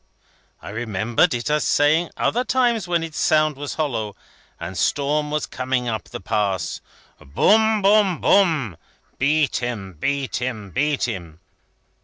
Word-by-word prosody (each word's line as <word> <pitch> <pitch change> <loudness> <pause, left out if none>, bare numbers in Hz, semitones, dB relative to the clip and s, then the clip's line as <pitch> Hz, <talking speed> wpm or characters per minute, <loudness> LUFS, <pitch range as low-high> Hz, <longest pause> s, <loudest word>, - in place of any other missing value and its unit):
I - - -7
remembered 115 - 0
it 120 +5 -2
as 150 0 +2
saying, 155 +4 +3
other 245 +2 +1
times, 240 -6 +1
when 170 -2 0
its 160 -1 -6
sound 155 -1 +3
was 145 +1 -6
hollow, 115 -10 -2 0.4
and 95 - -6
storm 145 +9 0
was 150 0 -1
coming 130 -1 -2
up 110 -2 -3
the - - -8
Pass: 100 -3 -1 0.4
'Boom, 215 - +3
boom, 200 -4 +4
boom. 155 - +2 0.4
Beat 150 +2 +2
him, 110 -6 -4
beat 140 - -2
him, 110 -6 -4
beat 145 +4 0
him.' 85 -9 -4
140 Hz, 140 wpm, -22 LUFS, 110-160 Hz, 0.4 s, boom